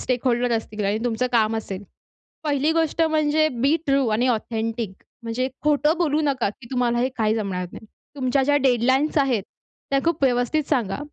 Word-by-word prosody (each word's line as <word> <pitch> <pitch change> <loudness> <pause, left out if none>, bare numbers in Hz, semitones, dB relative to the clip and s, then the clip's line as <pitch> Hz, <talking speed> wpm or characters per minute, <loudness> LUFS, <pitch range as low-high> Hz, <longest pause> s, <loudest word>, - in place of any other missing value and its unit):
Stakeholder 245 -1 0
असतील 215 -1 -5
आणि 205 +2 +1
तुमचं 245 +1 0
काम 225 -1 +2
असेल. 200 -3 -5 0.6
पहिली 290 0 +1
गोष्ट 325 0 +1
म्हणजे 310 -1 +2
बी 285 +4 +4
ट्रू 275 -2 +2
आणि 220 +3 +1
ऑथेंटिक 225 -2 -2 0.3
म्हणजे 235 +3 -2
खोटं 300 +2 +2
बोलू 310 -3 +1
नका, 265 -7 +1
की 235 +4 -15
तुम्हाला 245 -2 +1
हे 250 - +2
काही 220 -1 +1
जमणार 195 -4 -2
नाही. - - -10 0.3
तुमच्या 265 0 +1
ज्या 290 +2 +3
डेडलाईन्स 265 +3 +2
आहेत 255 -8 +1 0.5
त्या 275 - +3
खूप 330 -3 0
व्यवस्थित 250 +4 +1
सांगा. 235 -8 0
250 Hz, 165 wpm, -23 LUFS, 225-290 Hz, 0.6 s, बी